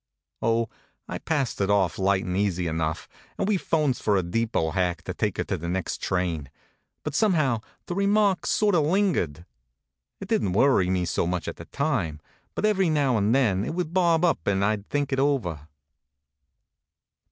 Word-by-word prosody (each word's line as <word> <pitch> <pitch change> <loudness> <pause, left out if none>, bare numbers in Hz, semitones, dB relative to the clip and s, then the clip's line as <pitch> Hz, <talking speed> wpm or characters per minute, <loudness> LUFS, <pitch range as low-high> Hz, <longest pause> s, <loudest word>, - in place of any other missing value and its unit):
Oh, 115 0 +1 0.4
I - - -5
passed 145 -9 -1
it 100 - +1
off 100 -3 +2
light 95 0 +2
and 90 - -2
easy 95 -3 0
enough, 80 -1 -2 0.3
and - - -1
we 210 -2 +2
phones 150 -7 0
for 105 -2 +2
a 95 - +1
depot 85 -3 0
hack 90 -2 -1
to 95 - -4
take 105 0 -2
her - - 0
to 95 - -3
the 85 +1 -5
next 95 -1 -3
train; 85 -7 -1 0.5
but 150 - -4
somehow 155 - +2 0.2
the - - -4
remark 200 0 +2
sort 210 -1 +2
of 165 -4 +4
lingered. 150 - 0 0.7
It 195 - -7
didn 205 - +1
t - - 0
worry 130 -9 +4
me 90 -1 +1
so 85 +1 0
much 90 -2 -2
at - - -5
the - - -9
time; 120 - -1 0.4
but - - 0
every 195 -4 +2
now 145 -5 +2
and 105 +2 +2
then 105 -8 +2
it 160 - -3
would 175 -2 -3
bob 175 -2 +3
up 160 - 0
and 100 0 +2
I 105 +1 +2
d 100 - -13
think 145 -1 -1
it 135 - +1
over. 100 - 0
110 Hz, 190 wpm, -25 LUFS, -, 0.7 s, of